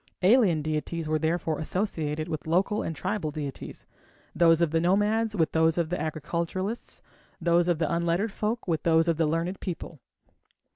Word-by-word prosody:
Alien 190 Hz, -, +4 dB
deities 155 Hz, +1 st, -3 dB
were 155 Hz, 0 st, +1 dB
therefore 160 Hz, -1 st, -1 dB
associated 155 Hz, -3 st, -2 dB
with 155 Hz, -2 st, -5 dB
local 185 Hz, +5 st, +1 dB
and 165 Hz, -, -4 dB
tribal 160 Hz, +1 st, -2 dB
deities, 145 Hz, -2 st, -7 dB, 0.5 s
those 165 Hz, -1 st, +4 dB
of 170 Hz, -3 st, +2 dB
the 165 Hz, -, +2 dB
nomads 210 Hz, +5 st, +2 dB
with 165 Hz, -5 st, +1 dB
those 160 Hz, 0 st, +2 dB
of 170 Hz, -2 st, 0 dB
the 180 Hz, -3 st, -2 dB
agriculturists, 170 Hz, +7 st, -4 dB, 0.4 s
those 170 Hz, 0 st, +2 dB
of 175 Hz, -2 st, +2 dB
the 160 Hz, -1 st, 0 dB
unlettered 170 Hz, +5 st, 0 dB
folks 215 Hz, +3 st, -3 dB
with 165 Hz, -3 st, 0 dB
those 165 Hz, 0 st, +3 dB
of 165 Hz, -2 st, +1 dB
the 165 Hz, -1 st, +2 dB
learned 165 Hz, +4 st, -1 dB
people. 170 Hz, -3 st, -6 dB
170 Hz, 165 wpm, -27 LUFS, 160-185 Hz, 0.5 s, Alien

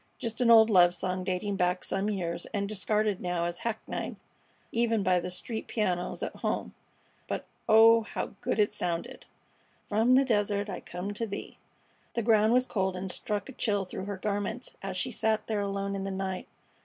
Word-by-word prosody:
Just 230 Hz, +1 st, -3 dB
an 240 Hz, -, +4 dB
old 225 Hz, -1 st, +8 dB
love 175 Hz, -2 st, +6 dB
song 185 Hz, +1 st, -2 dB
dating 195 Hz, +2 st, -2 dB
back 180 Hz, 0 st, +1 dB
some 195 Hz, +2 st, -1 dB
years 170 Hz, -4 st, -3 dB
and 200 Hz, 0 st, 0 dB
discarded 210 Hz, 0 st, 0 dB
now 175 Hz, -1 st, -1 dB
as 175 Hz, 0 st, -3 dB
hackneyed 230 Hz, -2 st, -4 dB, 0.6 s
even 230 Hz, -2 st, +1 dB
by 185 Hz, -1 st, +3 dB
the 180 Hz, -, -4 dB
street 220 Hz, +5 st, -4 dB
pianos 180 Hz, -5 st, -1 dB
at -, -, -4 dB
home; -, -, -2 dB, 0.5 s
but -, -, -3 dB, 0.2 s
oh, 225 Hz, +1 st, +8 dB
how 215 Hz, -, -4 dB
good -, -, -1 dB
it 210 Hz, -1 st, +3 dB
sounded! 170 Hz, -4 st, -3 dB, 0.6 s
From 225 Hz, +4 st, +3 dB
the 270 Hz, +1 st, +6 dB
desert 205 Hz, -3 st, 0 dB
I -, -, -4 dB
come 180 Hz, +4 st, -5 dB
to 225 Hz, +2 st, -2 dB
thee! 200 Hz, -1 st, -7 dB, 0.6 s
The 235 Hz, -, 0 dB
ground 220 Hz, -1 st, +4 dB
was 250 Hz, +1 st, +4 dB
cold, 190 Hz, -5 st, -1 dB
and 185 Hz, 0 st, -3 dB
struck 210 Hz, +2 st, -3 dB
a -, -, -7 dB
chill 205 Hz, -6 st, 0 dB
through 185 Hz, +1 st, -5 dB
her 200 Hz, -1 st, -4 dB
garments 205 Hz, +4 st, -3 dB
as 195 Hz, -1 st, -4 dB
she 250 Hz, +7 st, 0 dB
sat 220 Hz, -1 st, +1 dB
there 215 Hz, -2 st, -1 dB
alone 200 Hz, 0 st, -2 dB
in 195 Hz, -, -3 dB
the 195 Hz, -, -3 dB
night. 190 Hz, -1 st, -3 dB
200 Hz, 190 wpm, -29 LUFS, 185-220 Hz, 0.6 s, old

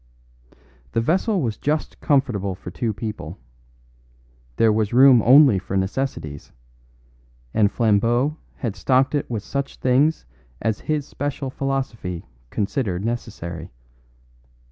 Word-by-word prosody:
The -, -, +2 dB
vessel 185 Hz, -, +1 dB
was 115 Hz, -3 st, -2 dB
just 150 Hz, +2 st, -2 dB
comfortable 120 Hz, -, +1 dB
for 90 Hz, -, -9 dB
two 115 Hz, +3 st, -2 dB
people; 110 Hz, +1 st, -6 dB, 1.2 s
there 110 Hz, -1 st, +4 dB
was 110 Hz, 0 st, 0 dB
room 130 Hz, -1 st, +7 dB
only 130 Hz, -3 st, +7 dB
for 95 Hz, +1 st, -3 dB
necessities, 95 Hz, -, -3 dB, 1.0 s
and 105 Hz, -2 st, +3 dB
Flambeau 120 Hz, +6 st, +2 dB, 0.2 s
had 115 Hz, -6 st, -4 dB
stocked 130 Hz, +8 st, +2 dB
it 145 Hz, -, -1 dB
with 110 Hz, -4 st, -3 dB
such 140 Hz, +2 st, -3 dB
things 135 Hz, +5 st, +2 dB, 0.3 s
as 110 Hz, -2 st, -1 dB
his 150 Hz, -2 st, -2 dB
special 140 Hz, -1 st, -4 dB
philosophy 130 Hz, -11 st, -3 dB, 0.2 s
considered 100 Hz, -, -2 dB
necessary. 100 Hz, -8 st, -5 dB
120 Hz, 115 wpm, -22 LUFS, 100-135 Hz, 1.2 s, room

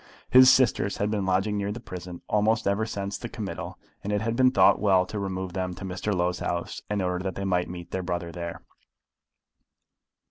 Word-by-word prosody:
His 130 Hz, 0 st, +9 dB
sisters 120 Hz, -6 st, +3 dB
had 105 Hz, +1 st, 0 dB
been 100 Hz, -3 st, -1 dB
lodging 95 Hz, +3 st, +1 dB
near 100 Hz, 0 st, -2 dB
the 110 Hz, -, -5 dB
prison 90 Hz, -5 st, -8 dB
almost 105 Hz, +1 st, +2 dB
ever 100 Hz, +3 st, +1 dB
since 100 Hz, -1 st, -4 dB
the 120 Hz, -, -6 dB
committal, 105 Hz, -4 st, -6 dB, 0.3 s
and 100 Hz, -, -3 dB
it 105 Hz, -, +1 dB
had 115 Hz, +1 st, -1 dB
been 130 Hz, +1 st, +5 dB
thought 130 Hz, -, +5 dB
well 95 Hz, -3 st, +3 dB
to 105 Hz, +3 st, -5 dB
remove 95 Hz, -2 st, -4 dB
them 90 Hz, -1 st, -3 dB
to 95 Hz, -, -8 dB
Mr. 95 Hz, +3 st, -3 dB
Low's 90 Hz, -2 st, 0 dB
house 85 Hz, 0 st, -3 dB
in 105 Hz, -2 st, 0 dB
order 90 Hz, 0 st, -1 dB
that 95 Hz, 0 st, -3 dB
they 100 Hz, -, -3 dB
might 90 Hz, -2 st, 0 dB
meet 85 Hz, -1 st, -8 dB
their 95 Hz, -, -2 dB
brother 85 Hz, -1 st, -3 dB
there. 85 Hz, -1 st, -6 dB
95 Hz, 205 wpm, -26 LUFS, 90-105 Hz, 0.3 s, His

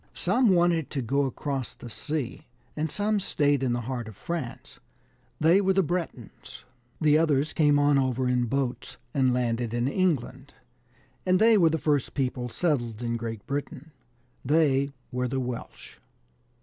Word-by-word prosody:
Some 245 Hz, -2 st, +2 dB
wanted 175 Hz, -4 st, +3 dB
to 135 Hz, -3 st, -3 dB
go 140 Hz, +4 st, +1 dB
across 135 Hz, 0 st, -4 dB
the -, -, -10 dB
sea, 140 Hz, +3 st, -4 dB, 0.3 s
and 155 Hz, +1 st, -1 dB
some 210 Hz, 0 st, +1 dB
stayed 145 Hz, -7 st, +1 dB
in 130 Hz, -2 st, +1 dB
the 120 Hz, -, -1 dB
heart 120 Hz, -1 st, -4 dB
of 110 Hz, -, -10 dB
France: 160 Hz, -8 st, -6 dB, 0.6 s
they 170 Hz, +5 st, +5 dB
were 190 Hz, -1 st, +2 dB
the 190 Hz, 0 st, +3 dB
Bretoons.* 165 Hz, -, -5 dB, 0.3 s
The 155 Hz, -1 st, +4 dB
others 150 Hz, -2 st, +1 dB
came 150 Hz, -3 st, +4 dB
on 145 Hz, -1 st, +4 dB
over 130 Hz, -1 st, 0 dB
in 125 Hz, -1 st, +1 dB
boats, 130 Hz, +1 st, -3 dB, 0.2 s
and 130 Hz, -2 st, +3 dB
landed 120 Hz, -1 st, -1 dB
in 120 Hz, +1 st, 0 dB
England, 140 Hz, -5 st, -1 dB, 0.7 s
and 185 Hz, 0 st, +3 dB
they 225 Hz, +3 st, +5 dB
were 170 Hz, -6 st, +5 dB
the 160 Hz, -, 0 dB
first 145 Hz, -4 st, 0 dB
people 125 Hz, -3 st, -2 dB
settled 120 Hz, -7 st, -1 dB
in 115 Hz, 0 st, -1 dB
Great 115 Hz, -3 st, -5 dB
Britain: 145 Hz, +2 st, -5 dB, 0.5 s
they 140 Hz, -1 st, +2 dB, 0.2 s
were 125 Hz, 0 st, -1 dB
the 135 Hz, +2 st, -2 dB
Welsh. 125 Hz, -2 st, -7 dB
140 Hz, 160 wpm, -27 LUFS, 125-160 Hz, 0.7 s, they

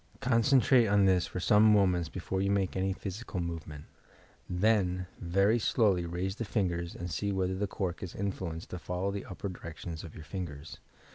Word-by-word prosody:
Con 125 Hz, -3 st, +2 dB
centrate 130 Hz, -3 st, +4 dB
on 100 Hz, -1 st, +5 dB
this 95 Hz, -2 st, +3 dB
for -, -, -5 dB
some 105 Hz, +3 st, +4 dB
moments 90 Hz, -5 st, +3 dB
before 95 Hz, +2 st, -3 dB
you 100 Hz, -, +1 dB
make 100 Hz, -2 st, +1 dB
any 95 Hz, +1 st, 0 dB
physical 100 Hz, +1 st, -5 dB
movement. 80 Hz, -3 st, -5 dB, 0.6 s
Then, 90 Hz, -1 st, +2 dB
very 100 Hz, +6 st, +2 dB
slowly 100 Hz, -7 st, +2 dB
raise 95 Hz, +4 st, -3 dB
the -, -, -2 dB
fingers 90 Hz, -5 st, -1 dB
and 90 Hz, 0 st, -5 dB
sec 100 Hz, +7 st, -1 dB
whether 95 Hz, -1 st, 0 dB
the 100 Hz, +2 st, -1 dB
cork 95 Hz, -3 st, -3 dB
is 95 Hz, -, -6 dB
influenced 90 Hz, -4 st, -4 dB
to 90 Hz, -, -4 dB
follow 90 Hz, +3 st, -2 dB
the 100 Hz, -1 st, -5 dB
upper 95 Hz, +2 st, -6 dB
direction 85 Hz, -2 st, -7 dB
of 80 Hz, 0 st, -8 dB
your 80 Hz, -, -9 dB
fingers. 80 Hz, -4 st, -7 dB
95 Hz, 185 wpm, -31 LUFS, 85-100 Hz, 0.6 s, on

